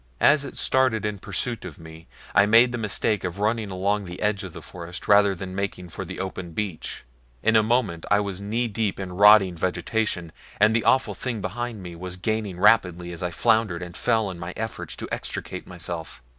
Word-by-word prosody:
As 145 0 +5
it 140 - -8
started 130 -5 +2
in 105 -1 -2
pursuit 120 +4 -2
of - - -8
me 80 0 -12 0.3
I 100 - +5
made 115 +3 +6
the 120 - -3
mistake 105 -1 0
of 90 0 -3
running 105 +1 0
along 100 +2 0
the 90 0 -8
edge 105 -2 0
of 95 - -7
the - - -9
forest 85 0 -8
rather 100 -1 +5
than 95 +1 -6
making 95 -2 -4
for 95 - -6
the 95 +1 -7
open 95 -2 -5
beach. 100 -3 -4 0.4
In 110 +1 +3
a 110 - +7
moment 110 -7 0
I 105 - +4
was 100 -2 -3
knee 115 +4 -1
deep 105 -3 -2
in 95 -2 -5
rotting 100 -1 +7
vegetation, 90 0 -1 0.3
and 105 +2 +5
the 115 - +1
awful 130 - +3
thing 120 -4 -4
behind 110 +2 -4
me 90 -1 -8
was 90 +1 -5
gaining 105 -1 -2
rapidly 90 -4 +3
as 85 - -7
I 90 - -1
floundered 110 -3 +1
and 85 -1 -9
fell 110 -4 +1
in 90 - -9
my 85 +1 -6
efforts 110 0 -4
to - - -6
extricate - - -5
myself. 85 -6 -6
100 Hz, 205 wpm, -25 LUFS, 90-110 Hz, 0.4 s, a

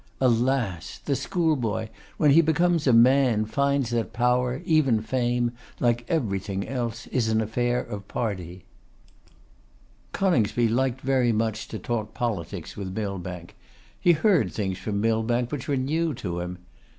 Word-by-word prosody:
Alas! 120 -7 +1
the 140 - +1
schoolboy, 130 - 0 0.3
when 150 -2 +4
he 160 +4 +7
becomes 165 0 +2
a - - +6
man, 120 -2 +5
finds 140 +1 0
that 115 -1 -1
power, 125 +1 +1
even 145 -8 +3
fame, 120 +1 0 0.3
like 120 -1 +1
everything 100 - -1
else, 120 -3 -3
is 120 -3 +1
an 110 0 +2
affair 120 +3 0
of 100 -1 -8
party. 90 -6 -4 1.5
Coningsby 120 - +2
liked 130 +2 0
very 130 -2 +2
much 110 -1 -1
to 110 - -6
talk 110 -2 -3
politics 110 -9 -4
with 95 -1 -6
Millbank. 90 -4 -5 0.4
He 175 - +5
heard 160 - +2
things 95 0 -3
from 100 +1 -2
Millbank 115 +2 +1
which 140 -3 -4
were 140 -2 +1
new 155 +4 0
to 85 -6 -4
him. 90 +1 -5
120 Hz, 140 wpm, -25 LUFS, 105-135 Hz, 1.5 s, he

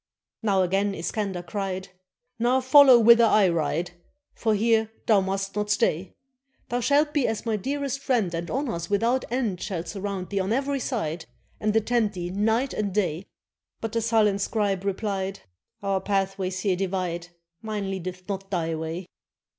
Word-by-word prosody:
Then 200 -4 +2
again 195 +2 +1
Iskander 190 +1 -3
cried: 190 0 -4 0.5
"Now 245 +3 +3
follow 260 0 +8
whither 235 0 +7
I 210 -3 +5
ride, 170 +1 -1 0.4
For 220 -2 0
here 220 +1 +2 0.2
thou 210 -3 +5
must 195 +1 -3
not 210 0 -1
stay. 190 -5 0 0.5
Thou 245 - 0
shalt 290 +5 +2
be 290 -4 +2
as 225 - -3
my 225 -2 +1
dearest 275 +5 -2
friend, 235 -11 0
And 170 +1 -3
honors 235 - -2
without 230 +5 +1
end 230 -8 -1
Shall 180 -5 -3
surround 195 +1 -5
thee 200 - 0
on 190 +2 -1
every 275 +2 0
side. 175 - -3 0.3
And 215 0 0
attend 220 -1 +2
thee 175 -1 -4
night 220 +7 +1
and 205 -2 -2
day." 185 -2 -1 0.5
But 225 - -4
the 230 - 0
sullen 215 -3 +2
scribe 200 -2 -1
replied: 195 -1 -2 0.4
"Our 195 -1 0
pathways 195 -1 -1
here 195 -3 +1
divide; 180 -2 -2 0.3
Mine 210 -3 -3
leadeth 185 -1 -6
not 195 -1 -4
thy 165 -4 -1
way." 160 +3 -4
200 Hz, 160 wpm, -25 LUFS, 185-230 Hz, 0.5 s, follow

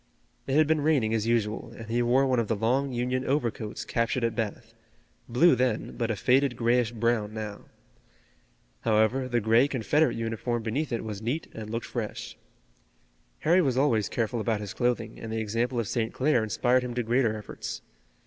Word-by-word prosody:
It 135 - 0
had 155 +1 +6
been 155 0 +1
raining 140 -8 +2
as 110 0 0
usual, 115 -1 0
and 115 - -8
he 120 +2 0
wore 125 +3 +3
one 130 -2 +2
of 115 - 0
the 115 - 0
long 130 +6 +1
Union 125 +1 -1
overcoats 120 -6 -2
captured 115 +2 0
at 115 -1 +1
Bath, 115 0 -4 0.6
blue 130 +9 +5
then 125 -3 -1
but 115 -2 -1
a 115 - 0
faded 130 +4 +2
grayish 120 0 +2
brown 115 -2 0
now. 105 -2 -6 1.1
However, 110 +4 +2
the 120 -1 +1
gray 115 +4 +4
Confederate 145 +4 +1
uniform 115 +1 -2
beneath 135 +7 -2
it 115 - -2
was 105 -2 -5
neat 125 +9 -2
and 110 -1 -7
looked 115 +1 -3
fresh. 115 -4 -5 1.1
Harry 175 +4 +4
was 130 -6 +1
always 120 -7 +2
careful 115 0 -1
about 110 0 0
his 105 -2 -6
clothing, 120 -3 -1
and 115 - -6
the 110 - -2
example 115 +3 -1
of 115 - -2
St. 115 0 -1
Clair 130 -3 +2
inspired 120 +4 +2
him 125 -1 -5
to 125 - 0
greater 115 -1 +1
efforts. 105 - -7
120 Hz, 185 wpm, -27 LUFS, 110-130 Hz, 1.1 s, had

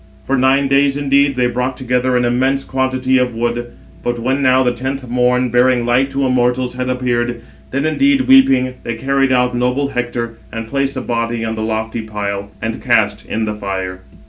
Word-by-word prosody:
For 135 - 0
nine 135 +2 +3
days 140 0 +2
indeed 140 -1 +2
they 125 -1 +1
brought 125 +1 -2
together 125 0 0
an 125 - +1
immense 130 +3 +1
quantity 130 0 0
of 125 -2 -1
wood; 120 +1 -2 0.4
but 120 0 -1
when 130 +4 -1
now 130 -1 +4
the 125 - +2
tenth 130 +2 -4
morn, 125 +1 +1
bearing 125 0 +3
light 125 +3 +2
to 135 0 -1
mortals, 125 0 +1
had 125 0 -3
appeared, 120 -2 -1 0.3
then 140 +3 -1
indeed, 275 - +3
weeping, 135 - +4
they 115 - -4
carried 135 +3 +1
out 125 -1 +2
noble 125 +3 0
Hector, 120 -2 -3
and 115 +1 -5
placed 140 +2 -1
the 130 - -3
body 115 -1 -2
on 110 - -2
the 110 - -4
lofty 110 +1 -2
pile, 100 -2 -4
and 115 0 -3
cast 110 -4 +1
in 110 0 -2
the 105 - -2
fire. 95 -3 -4
125 Hz, 190 wpm, -17 LUFS, 120-130 Hz, 0.4 s, now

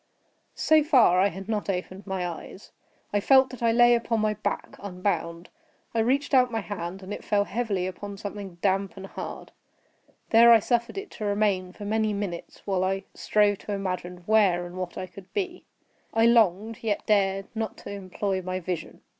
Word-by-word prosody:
So 310 -1 +4
far, 250 - +5
I 195 - +5
had 195 0 -7
not 215 -2 -2
opened 185 +1 -4
my 190 -2 -2
eyes. 175 +3 -9 0.4
I 205 - +3
felt 265 +4 +5
that 255 - -10
I 230 -1 +3
lay 240 +1 +6
upon 230 -1 +1
my 215 0 +1
back, 215 - -4
unbound. 180 -3 -3 0.4
I 230 - 0
reached 270 +6 +1
out 250 -1 +5
my 225 -1 -1
hand, 190 -1 -6
and 190 +2 -6
it - - -7
fell 205 -1 +2
heavily 205 -3 -2
upon 200 +2 -6
something 200 -2 -7
damp 195 0 +1
and 195 - -7
hard. - - -7 0.8
There 235 +1 +8
I 230 - +9
suffered 235 - -1
it 395 +1 -6
to 215 - -6
remain 200 -3 +1
for 205 - -9
many 215 0 +1
minutes, 200 -4 -5
while 190 -2 0
I 195 +1 -1
strove 205 -1 +2
to 205 - -5
imagine 180 -2 -4
where 195 -5 +3
and 175 0 -9
what 185 -1 -5
I 185 - -3
could 185 +1 -14
be. 370 -3 -3 0.5
I 225 0 +5
longed, 220 -2 +3
yet 215 -3 -1
dared 195 -2 +2
not 220 -2 -3
to - - -6
employ 195 0 -3
my 185 0 -3
vision. 180 -1 -5
200 Hz, 190 wpm, -26 LUFS, 185-225 Hz, 0.8 s, I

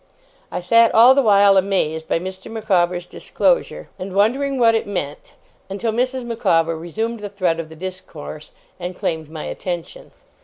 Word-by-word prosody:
I - - -3
sat 230 +6 +5
all 235 +4 +8
the 275 - +3
while, 200 -4 +5
amazed 170 -5 0
by - - +1
Mr. 190 +2 -7
Micawber's 180 -5 0
disclosure, - - -1
and 185 +1 -6
wondering 265 +7 +1
what 230 -2 +4
it 225 - -1
meant; 150 -8 -5 0.4
until 205 +4 -2
Mrs. 255 +3 -1
Micawber 165 -8 +1
resumed 220 +8 -4
the 205 -1 -6
thread 185 -5 -1
of 160 -1 -5
the 160 - -12
discourse, 160 -4 -8 0.3
and 180 +1 -5
claimed 160 -3 -3
my 155 -1 -7
attention. 185 - -6
195 Hz, 160 wpm, -20 LUFS, 170-225 Hz, 0.4 s, all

